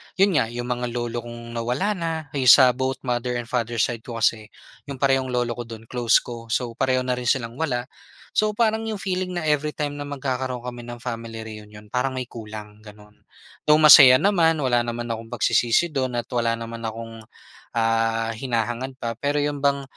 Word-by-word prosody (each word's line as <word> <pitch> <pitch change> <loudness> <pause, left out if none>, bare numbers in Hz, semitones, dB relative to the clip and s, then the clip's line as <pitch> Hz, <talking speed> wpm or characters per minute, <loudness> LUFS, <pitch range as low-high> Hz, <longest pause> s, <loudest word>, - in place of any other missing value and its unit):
Yun 195 -5 +3
nga 115 - +1
yung 120 +1 -5
mga 125 0 -2
lolo 120 -1 -2
kong 120 0 -9
nawala 125 - -1
na 170 -5 -2 0.3
yung 130 - 0
sa 130 -1 +9
both 130 +1 -3
mother 125 -1 -1
and 120 0 -5
father 120 -2 -1
side 115 0 0
ko 115 +1 -9
kasi 110 -1 +1 0.4
yung 140 - -5
parehong 135 0 +1
lolo 125 -1 -1
ko 120 - -5
dun 115 -1 -9
close 120 -3 +3
ko, 115 -1 -8
so 120 +1 -1
pareho 130 +1 0
na 125 -1 -1
rin 125 - -5
silang 115 0 0
wala. 125 -6 -1 0.5
So, 215 0 +3
parang 220 0 +1
yung 215 -3 -3
feeling 185 -1 -2
na - - -5
every 150 0 +1
time 145 -1 -3
na - - -3
magkakaroon 130 -3 -3
kami 120 -1 -7
ng 120 0 -7
family 115 -2 -5
reunion 105 -1 -11
parang 130 +1 -1
may 130 -1 -4
kulang 105 -2 -9
ganon. 105 0 -16 0.4
Though 150 - +7
masaya 140 -4 +10
naman 170 -3 +3
wala 120 -3 +2
naman 120 0 -4
akong 115 0 -5
pagsisisi 120 +6 +2
dun 130 -4 -2
at 120 - -6
wala 115 -2 0
naman 115 0 -7
akong, 115 0 -6 0.5
ah, 115 0 +1
hinahangad 120 +1 -2
pa 115 0 -3
pero 145 +1 -1
yun 145 -1 0
bang 140 0 +1
120 Hz, 195 wpm, -23 LUFS, 115-135 Hz, 0.5 s, masaya